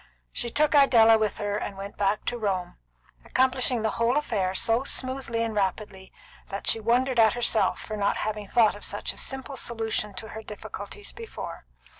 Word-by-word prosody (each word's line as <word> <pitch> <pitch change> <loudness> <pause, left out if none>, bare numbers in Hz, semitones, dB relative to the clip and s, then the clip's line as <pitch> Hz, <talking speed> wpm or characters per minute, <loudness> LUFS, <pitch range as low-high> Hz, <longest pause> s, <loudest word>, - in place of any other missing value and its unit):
She 240 - -2
took 300 +5 +2
Idella 230 -6 +6
with 215 -2 0
her 205 -1 -2
and 200 -2 -5
went 200 +1 -7
back 205 +1 0
to 245 - -1
Rome, 190 -4 -2 0.5
accomplishing 255 -2 +1
the 220 - +1
whole 240 +4 +3
affair 195 -10 -1
so 230 +4 +2
smoothly 260 -4 -2
and 225 -1 -2
rapidly 195 -1 -2 0.4
that 200 - -5
she 225 - +3
wondered 245 +3 +2
at 220 0 +6
herself 240 -2 +2
for 215 - -6
not 200 -1 0
having 210 -1 -3
thought 225 0 +4
of 205 - -10
such - - -2
a - - -16
simple 265 0 -3
solution 220 -4 -3
of 220 - -9
her 220 - -7
difficulties 210 - -8
before. 460 -1 -8
225 Hz, 180 wpm, -26 LUFS, 205-250 Hz, 0.5 s, Idella